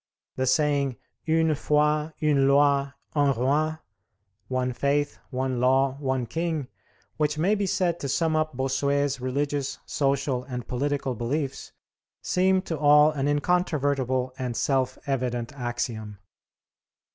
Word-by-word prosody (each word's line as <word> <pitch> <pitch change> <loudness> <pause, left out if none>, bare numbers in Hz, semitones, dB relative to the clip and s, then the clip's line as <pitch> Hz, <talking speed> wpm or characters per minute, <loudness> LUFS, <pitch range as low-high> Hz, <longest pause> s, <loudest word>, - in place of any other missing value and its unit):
The 130 0 -1
saying 140 -1 +2 0.3
"Une 160 0 +3
foi, 150 +1 +1
une 140 -3 +3
loi, 140 0 +3 0.2
un 145 -2 +3
roi" 145 +6 +1 0.7
(one 130 -1 -1
faith, 145 +3 0
one 130 -1 -2
law, 130 +1 +3
one 130 -3 -1
king), 160 +1 -3 0.5
which 150 -1 0
may 180 +7 +2
be 200 -2 0
said 175 -2 0
to 140 - -4
sum 160 +3 +1
up 155 -4 -1
Bossuet's 140 +1 0
religious, 140 +2 -2
social, 135 -2 0
and 125 -3 -6
political 135 +1 -1
beliefs, 135 +4 -3 0.5
seemed 185 +1 +1
to 160 -3 -3
all 150 +1 +6
an 140 -2 -2
incontrovertible 145 -5 0
and 125 -3 -3
self 130 +1 0
evident 125 -1 -2
axiom. 120 -5 -4
140 Hz, 125 wpm, -26 LUFS, 130-150 Hz, 0.7 s, all